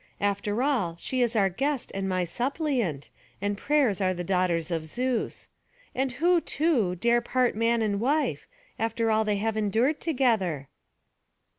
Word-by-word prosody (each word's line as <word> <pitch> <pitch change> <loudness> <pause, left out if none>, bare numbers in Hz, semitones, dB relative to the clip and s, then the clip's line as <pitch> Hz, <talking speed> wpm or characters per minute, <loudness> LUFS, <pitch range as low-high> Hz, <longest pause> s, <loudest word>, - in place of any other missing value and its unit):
After 205 +3 0
all, 215 - 0
she 255 +6 -2
is 240 -1 +1
our 200 -3 +4
guest 270 +8 -2
and 195 0 -2
my 185 -1 0
suppliant, 240 - -2 0.3
and 205 +1 -1
prayers 255 -4 +1
are 185 -1 +1
the 175 - -4
daughters 180 -2 0
of 160 -2 -2
Zeus. 250 +7 -2 0.5
And 265 -1 -1
who, 345 +5 +3
too, 275 - +1
dare 235 +6 +2
part 250 0 +1
man 230 +1 +2
and 205 -2 0
wife, 285 +7 0 0.3
after 225 0 0
all 220 0 +3
they 210 -1 0
have 220 +2 -1
endured 220 +8 +1
together?" 220 - 0
225 Hz, 155 wpm, -27 LUFS, 190-255 Hz, 0.5 s, our